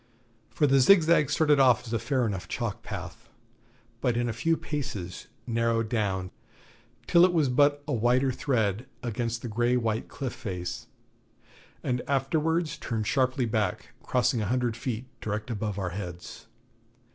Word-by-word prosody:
For 150 - +1
the 135 -1 +4
Zigzag 160 -1 +5
started 150 -1 +3
off 125 -3 +5
as 115 - -6
a 115 - +1
fair 125 +2 0
enough 95 -4 -3
chalk 115 -2 -3
path, 105 +2 -8 0.7
but 120 -3 +1
in 120 0 +1
a 115 - -2
few 160 +9 +1
paces 100 - -5 0.2
narrowed 115 -2 0
down 95 -5 -1 0.7
till 170 0 +5
it 185 - +6
was 155 -6 +2
but 145 +3 +3
a - - -1
whiter 125 +3 +2
thread 115 -3 -1 0.2
against 120 0 -2
the - - -3
grey 120 +3 +1
white 115 -1 -1
cliff 130 -4 -5
face, 90 -7 -5 1.0
and 125 -1 -1
afterwards 155 +4 0
turned 110 -2 -2
sharply 130 +1 +1
back, 110 -4 -1
crossing 125 -1 +1
a 105 - -1
hundred 120 0 0
feet 120 0 -4
direct 110 +2 -4
above 105 -2 -3
our 95 -3 -2
heads. 90 -2 -7
120 Hz, 155 wpm, -28 LUFS, 110-135 Hz, 1.0 s, it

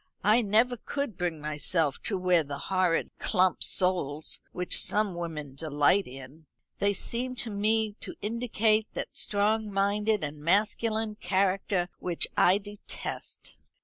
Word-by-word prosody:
I 215 +4 +5
never 230 +4 +2
could 280 -1 -4
bring 175 -3 -2
myself 150 0 0
to 200 - +2
wear 180 -2 +3
the 140 -1 -6
horrid 185 +1 0
clump 185 -3 +2
soles 165 -5 +1
which 180 0 +1
some 210 -2 +1
women 160 -5 -6
delight 150 +6 +2
in. 135 +4 -12 0.3
They 200 0 +3
seem 245 +5 -2
to 235 -2 -3
me 215 +1 +1
to - - -6
indicate 220 -1 +1
that - - -5
strong 210 +1 0
minded 205 0 +1
and 150 0 -5
masculine 215 +4 +1
character 190 -1 0
which 175 -2 0
I 185 +2 +5
detest. 205 0 -8
195 Hz, 135 wpm, -28 LUFS, 165-215 Hz, 0.3 s, I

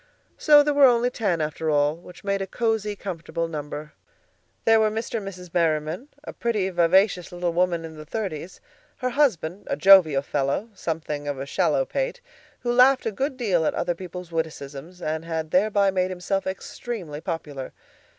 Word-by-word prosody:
So 295 -1 +6
there 295 0 +1
were 285 -1 +7
only 245 0 +3
ten, 195 -9 0
after 155 +1 -2
all, 145 0 +2
which 175 +1 -14
made 200 -1 -1
a 195 - -3
cozy, 220 -1 -1
comfortable 170 -4 -4
number. 150 -1 -6 0.7
There 225 0 +6
were 215 -1 +3
Mr. 225 +2 -3
and 200 - -8
Mrs. 180 -3 -9
Merriman, 165 - 0 0.2
a - - -8
pretty, 215 -5 -1
vivacious 180 +1 +3
little 175 -1 -2
woman 175 -1 +1
in 160 -1 -9
the 155 - -8
thirties; 185 -4 -5 0.4
her 255 -1 -2
husband, 205 - +1
a - - -1
jovial 160 -5 +6
fellow, 140 +10 -1
something 155 -5 -4
of 145 -1 -2
a 135 - -4
shallow - - +1
pate, - - -2 0.4
who 240 0 0
laughed 255 +2 +5
a 225 - 0
good 265 +5 -2
deal 195 -9 +1
at - - 0
other 175 - 0
people's 180 0 -8
witticisms, 160 +1 -5
and 155 +1 -2
had 160 -1 -4
thereby 200 0 +3
made 185 -1 0
himself 185 +2 -2
extremely 190 -4 -5
popular. 150 -7 -5
180 Hz, 175 wpm, -24 LUFS, 160-215 Hz, 0.7 s, were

